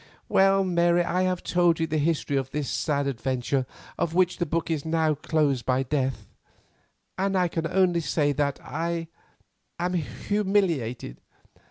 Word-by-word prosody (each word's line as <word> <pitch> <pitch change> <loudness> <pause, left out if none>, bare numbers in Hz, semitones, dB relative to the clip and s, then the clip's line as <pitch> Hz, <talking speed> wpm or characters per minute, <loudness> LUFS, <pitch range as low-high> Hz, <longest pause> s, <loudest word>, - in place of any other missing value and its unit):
Well, 195 0 +4
Mary, 175 -1 +3
I 180 +1 0
have 180 -1 -3
told 175 -2 +2
you 165 - +1
the 155 -1 -1
history 150 -2 0
of 135 -1 -1
this 150 -1 -3
sad 145 -2 0
adventure 130 0 -1 0.3
of 165 0 -1
which 185 0 +3
the 175 - 0
book 165 +2 -1
is 155 -3 -1
now 160 -1 +1
closed 145 -4 0
by 130 +2 +1
death, 135 -1 -2 0.9
and 195 0 +1
I 180 -1 +3
can 165 -1 -2
only 180 -1 +2
say 150 -2 +1
that 140 0 -1
I 165 +2 -3 0.7
am 180 +1 -1
humiliated. 175 - -1
160 Hz, 155 wpm, -26 LUFS, 140-175 Hz, 0.9 s, Well